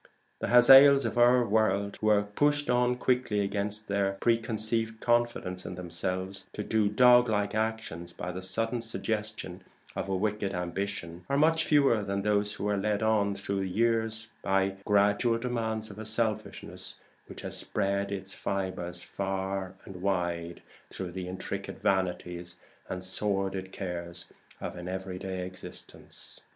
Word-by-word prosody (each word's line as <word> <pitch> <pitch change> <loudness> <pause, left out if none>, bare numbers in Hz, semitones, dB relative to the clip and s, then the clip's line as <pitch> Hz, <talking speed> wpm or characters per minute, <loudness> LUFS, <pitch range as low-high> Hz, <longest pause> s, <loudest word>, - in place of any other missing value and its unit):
The - - -2
Hazaels 135 +3 +8
of - - -2
our 120 +1 +5
world 100 -2 +1
who 110 - +1
are 105 -1 +5
pushed 145 +7 +1
on 125 0 +3
quickly 125 -5 +1
against 100 +2 -1
their 100 -1 0
preconceived 115 -1 0
confidence 120 -7 0
in 90 - -6
themselves 90 +2 -4
to 105 - -4
do 105 -1 +2
doglike 115 -3 +5
actions 110 -6 -2
by 90 - -5
the 90 +1 -6
sudden 115 +5 0
suggestion 110 -5 -3 0.3
of - - -3
a 95 - +1
wicked 100 0 -1
ambition, 90 -1 -4
are 140 - +2
much 160 +2 +3
fewer 140 -7 +4
than 100 -1 -2
those 105 0 +1
who 105 - -3
are 105 -1 +1
led 105 +1 0
on 105 -2 +2
through 100 0 -3
the 95 -1 -2
years 110 +2 0
by 95 0 +2
the 95 0 -12
gradual 105 +3 +3
demands 110 -3 -2
of 100 - -11
a 110 - -6
selfishness 110 -1 -2 0.3
which - - -9
has - - -5
spread 100 0 -1
its 95 -1 -5
fibres 90 -3 -4
far 95 -1 -3
and 90 -2 -9
wide 85 -3 -2 0.3
through 95 -2 -6
the 90 0 -5
intricate 95 +1 -5
vanities 90 -2 -1 0.3
and 95 0 -4
sordid 95 -1 -1
cares 85 -2 -5 0.3
of - - -5
an 90 0 -7
everyday 95 0 -4
existence. 90 0 -11
100 Hz, 150 wpm, -29 LUFS, 95-110 Hz, 0.3 s, Hazaels